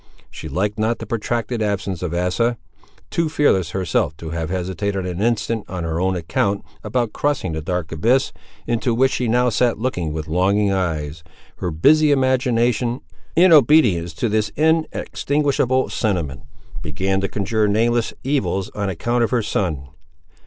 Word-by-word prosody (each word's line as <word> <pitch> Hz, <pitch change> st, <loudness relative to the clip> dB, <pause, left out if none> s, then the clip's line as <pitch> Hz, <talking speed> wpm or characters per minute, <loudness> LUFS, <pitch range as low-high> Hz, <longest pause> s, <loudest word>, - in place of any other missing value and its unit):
She 80 Hz, -, -8 dB
liked 100 Hz, +8 st, -1 dB
not 110 Hz, +2 st, +1 dB
the 110 Hz, -, -7 dB
protracted 115 Hz, +1 st, -2 dB
absence 100 Hz, -3 st, -2 dB
of 90 Hz, -3 st, -3 dB
Asa. 90 Hz, +8 st, 0 dB, 0.5 s
Too 165 Hz, -2 st, 0 dB
fearless 100 Hz, -, +2 dB
herself 85 Hz, -4 st, -1 dB
to 80 Hz, 0 st, -7 dB
have 80 Hz, -1 st, -3 dB
hesitated 95 Hz, +1 st, -2 dB
an 90 Hz, +1 st, -4 dB
instant 115 Hz, -1 st, 0 dB
on 90 Hz, -2 st, -4 dB
her 80 Hz, +1 st, -2 dB
own 95 Hz, 0 st, +1 dB
account 100 Hz, +4 st, -1 dB, 0.2 s
about 115 Hz, +1 st, -1 dB
crossing 145 Hz, -, -1 dB
the 80 Hz, 0 st, -3 dB
dark 90 Hz, 0 st, -3 dB
abyss, 115 Hz, +12 st, +1 dB, 0.3 s
into 120 Hz, 0 st, 0 dB
which 130 Hz, +2 st, +3 dB
she 125 Hz, -, -1 dB
now 125 Hz, +2 st, +3 dB
sat 120 Hz, +2 st, +1 dB
looking 95 Hz, -9 st, -2 dB
with 80 Hz, 0 st, -5 dB
longing 100 Hz, +5 st, +2 dB
eyes, 80 Hz, -5 st, -2 dB, 0.3 s
her 90 Hz, -, -2 dB
busy 145 Hz, -, +4 dB
imagination, 125 Hz, -3 st, +1 dB, 0.3 s
in 180 Hz, +1 st, +6 dB
obedience 115 Hz, -, +4 dB
to 120 Hz, -, -1 dB
this 105 Hz, -1 st, 0 dB
inextinguishable 145 Hz, -4 st, +1 dB
sentiment, 85 Hz, -, -2 dB, 0.4 s
began 95 Hz, +6 st, -1 dB
to 100 Hz, -, 0 dB
conjure 105 Hz, +2 st, 0 dB
nameless 115 Hz, +3 st, +1 dB
evils 130 Hz, -8 st, -1 dB
on 100 Hz, -2 st, -3 dB
account 120 Hz, +7 st, 0 dB
of 115 Hz, -, +1 dB
her 120 Hz, -3 st, +1 dB
son. 80 Hz, -10 st, -2 dB
105 Hz, 155 wpm, -21 LUFS, 90-120 Hz, 0.5 s, in